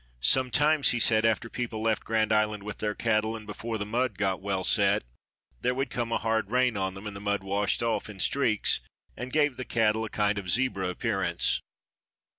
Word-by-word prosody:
Sometimes 140 +3 +4
he 120 - 0
said 110 -1 +4
after 115 +1 0
people 115 -2 -4
left 110 -1 0
Grand 110 -1 +1
Island 105 -1 +1
with 105 0 -7
their 105 -1 -2
cattle 110 -1 0
and 110 -1 -9
before 110 +2 -5
the 100 - -3
mud 115 -1 -1
got 95 -2 0
well 95 -1 -2
set, 100 0 +3 0.6
there 125 - 0
would 135 -1 -2
come 120 -1 -2
a - - +2
hard 110 -2 -1
rain 125 -1 +2
on 95 -1 -2
them 95 +2 -9
and 105 -1 -6
the - - -6
mud 100 -1 -1
washed 100 +3 0
off 115 -1 -1
in 100 -3 -10
streaks 115 -2 +2 0.4
and 125 +1 -6
gave 145 -3 +2
the 130 - -4
cattle 110 -2 +1
kind 105 0 +1
of 100 - -8
a - - -5
zebra 100 -3 +1
appearance. 90 -3 0
110 Hz, 205 wpm, -28 LUFS, 100-120 Hz, 0.6 s, Sometimes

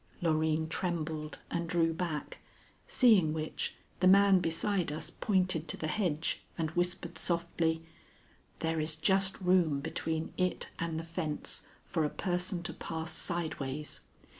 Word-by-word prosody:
Loreen 160 -1 +1
trembled 160 -3 -2
and 170 -1 -1
drew 165 -1 +2
back, 160 -3 -3 0.5
seeing 200 -11 +5
which, 155 0 -3 0.2
the 185 - +4
man 195 0 +7
beside 175 +1 0
us 155 - -4
pointed 185 -5 +1
to - - +2
the - - -3
hedge 160 -2 0
and 160 -2 -1
whispered 175 0 -1
softly: 170 -1 0 0.8
"There 160 0 0
is 155 0 0
just 190 +4 +2
room 180 -6 +3
between 160 +2 -2
it 185 -1 0
and 165 -1 -2
the - - -5
fence 165 -2 -4 0.2
for 165 -4 0
a 150 - +1
person 180 0 -1
to 175 -2 -2
pass 160 0 -4
sideways. 150 -4 -2
165 Hz, 140 wpm, -32 LUFS, 160-180 Hz, 0.8 s, man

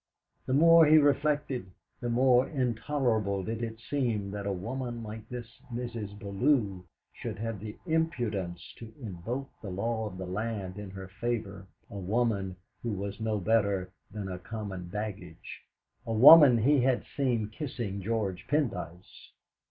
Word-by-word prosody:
The 130 - +1
more 165 +1 +7
he 155 +1 +7
reflected, 145 -5 +2 0.3
the 120 - -3
more 125 +1 +4
intolerable 115 - 0
did 115 +3 -4
it 115 -1 -4
seem 115 -8 -1
that 100 0 -4
a - - 0
woman 120 +5 -4
like 110 0 -8
this 120 -2 -8
Mrs. 115 -4 -5
Bellew 100 -2 0 0.3
should - - -6
have 115 -1 -4
the 105 +1 -7
impudence 120 - -2
to 115 -1 -9
invoke 115 +5 -5
the 105 - -6
law 110 +4 -2
of 95 -3 -8
the 95 - -5
land 100 0 -4
in 105 -2 -7
her 95 0 -8
favour 100 -2 -4 0.2
a 100 - -7
woman 100 -1 0 0.3
who 120 - -3
was 100 +1 -5
no 110 -1 0
better 100 -3 +1 0.2
than 105 -2 -5
a 90 -1 -5
common 95 -3 -6
baggage 100 -4 -6 0.5
a 115 - -1
woman 135 +2 +10
he 135 +4 +4
had 130 0 +2
seen 120 -6 0
kissing 115 -7 -4
George 105 -1 -2
Pendyce. 120 - -3
110 Hz, 150 wpm, -29 LUFS, 100-125 Hz, 0.5 s, woman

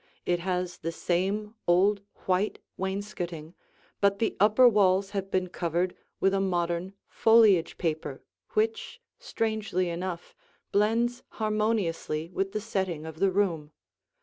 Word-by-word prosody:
It 175 -1 +1
has 180 0 -2
the 165 - -3
same 195 +6 -1
old 195 +4 +4 0.2
white 185 +3 +1 0.2
wainscoting, 180 -4 -4 0.5
but 200 0 +3
the 225 - 0
upper 215 +5 +6
walls 195 -3 +3
have 195 -2 -3
been 185 -1 0
covered 175 0 -1 0.2
with 195 0 +3
a 195 - +2
modern 175 0 -1
foliage 215 -7 +4
paper 160 -2 -3 0.3
which, 450 +2 -1 0.2
strangely 220 - -1
enough, 175 0 -5 0.4
blends 230 +4 +2
harmoniously 210 -7 -1
with 195 +2 -1
the 215 +1 -3
setting 190 -7 -2
of 160 0 -8
the 195 - +4
room. 170 -6 0
190 Hz, 125 wpm, -28 LUFS, 175-210 Hz, 0.5 s, upper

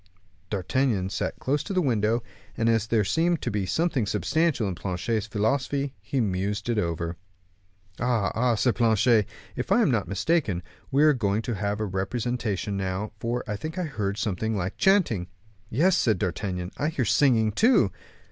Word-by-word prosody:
D'Artagnan 100 0 0
sat - - -2
down - - -28
close 145 +2 +1
to - - -5
the 185 - +2
window, 115 -4 +1 0.3
and 115 - +1
as 115 -2 +2
there 110 -2 +2
seemed 165 - +1
to - - -1
be 100 -2 -1
something 150 - 0
substantial 160 - +1
in 95 - -2
Planchet's 100 +5 -2
philosophy, 135 +6 0
he 135 - -2
mused 100 0 -1
over 85 -6 -1
it. - - -9 0.8
"Ah, 120 -6 +1
ah!" 125 +1 +2
exclaimed 120 +2 +1
Planchet, 115 -2 +4 0.3
"if - - -4
I - - +5
am - - +3
not - - 0
mistaken, 100 - 0 0.3
we 140 +2 +3
are 155 -1 +6
going 110 -3 0
to 120 - -2
have 100 0 -2
a 110 - 0
representation 105 +1 -2
now, 95 +2 -2
for 120 +2 -2
I 105 - -2
think 155 - -6
I 180 - 0
heard 105 - -3
something 110 0 -1
like 95 +1 -3
chanting." 175 - +2 0.4
"Yes," 165 +10 +3
said 110 -3 +2
D'Artagnan, 90 -1 -3
"I 145 - +1
hear 140 -6 -1
singing 110 -2 +3
too." 220 - +4
110 Hz, 175 wpm, -26 LUFS, 100-130 Hz, 0.8 s, are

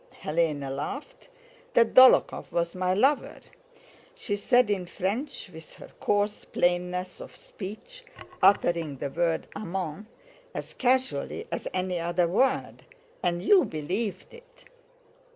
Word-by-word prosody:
Hélène 150 -3 0
laughed, 285 - -6 0.5
"that 230 -1 +4
Dólokhov 260 0 +6
was 170 0 -1
my 185 0 0
lover," 270 +8 +1 0.8
she 235 - -3
said 245 +2 +3
in 185 -3 -1
French 205 - -4
with 160 -1 -12
her - - -13
coarse 205 0 0
plainness 180 +1 -1
of - - -11
speech, 225 - -9 0.4
uttering 170 -7 +3
the 135 - -4
word 170 0 0
amant 190 -1 -5 0.5
as - - -6
casually 255 - 0
as - - -3
any 185 -1 -2
other 170 +1 +1
word, 260 +9 +1 0.4
"and 175 0 -1
you 390 -4 +6
believed 185 - -4
it! - - -17
185 Hz, 120 wpm, -27 LUFS, 170-250 Hz, 0.8 s, Dólokhov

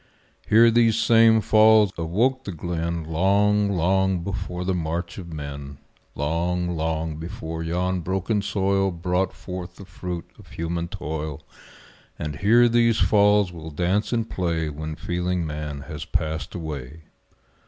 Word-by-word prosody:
Here 115 +2 +7
these 115 -1 +4
same 115 -1 +5
falls 110 -1 +5
awoke 115 +11 0
the 100 - -4
glen 85 0 -3
Long, 100 +5 +2
long 95 0 +1
before 90 -1 -4
the 95 - +1
march 85 +1 -3
of 85 -2 -9
men; 70 -2 -7 0.4
Long, 85 +4 -1
long 80 -1 -2
before 80 0 -6
yon 90 +3 -1
broken 95 +4 -1
soil 100 -1 +1
Brought 90 +2 -1
forth 90 -1 -8
the 100 - -11
fruit 90 -1 -6
of - - -15
human 85 +1 -3
toil 80 -5 -5 0.7
And 75 -1 -4
here 115 +6 +5
these 115 -1 +3
falls 105 -3 +4
will 80 -1 -8
dance 90 +7 0
and 115 -2 0
play 85 -5 -1
When 75 +1 -5
feeling 90 +1 -2
man 75 -2 -5
has 75 +2 -7
passed 80 0 -3
away. 80 -2 -6
90 Hz, 140 wpm, -24 LUFS, 80-100 Hz, 0.7 s, Here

